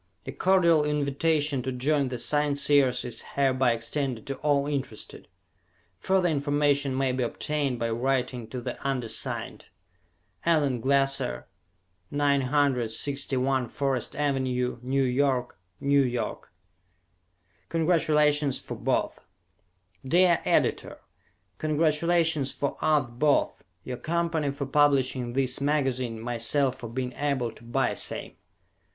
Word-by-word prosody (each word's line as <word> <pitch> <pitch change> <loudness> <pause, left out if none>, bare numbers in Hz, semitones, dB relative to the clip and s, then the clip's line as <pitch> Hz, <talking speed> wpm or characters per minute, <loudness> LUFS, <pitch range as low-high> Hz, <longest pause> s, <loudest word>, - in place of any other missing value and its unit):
A - - -5
cordial 170 -5 +3
invitation 150 0 0
to 130 +2 -3
join 140 +2 +1
the 125 -1 -4
Scienceers 145 -1 +2
is 120 -2 -5
hereby 130 -3 +3
extended 115 +1 -3
to 135 - -4
all 145 -1 +1
interested. 135 -7 -5 0.7
Further 190 - +2
information 145 -2 +1
may 135 -1 +1
be 130 0 -2
obtained 140 +2 -1
by 115 -1 -2
writing 125 -1 -1
to 125 +2 -6
the - - -5
undersigned. 130 -4 -3 0.8
Allen 145 -7 +2
Glasser, 135 - +1 0.6
961 135 -2 0
Forest 135 -3 -2
Avenue, 130 -4 -1
New 135 +2 0
York, 125 -3 0 0.2
N. 140 - -3 0.2
Y. 120 -3 -2 1.3
"Congratulations 150 -4 +2
for - - -7
Both" - - -1 0.8
Dear 175 +5 +3
Editor: - - +1 0.6
Congratulations 155 -1 +1
for 140 - -3
us 150 -3 +3
both. 140 +5 +1 0.2
Your 125 -1 -5
company 165 -1 -1
for 140 0 -4
publishing 135 -3 +2
this 130 0 0
magazine, 130 -5 0
myself 120 +3 +1
for 120 - -7
being 125 +1 -4
able 140 -5 -1
to 115 - -17
buy 120 +3 0
same. - - -4
135 Hz, 110 wpm, -27 LUFS, 125-150 Hz, 1.3 s, cordial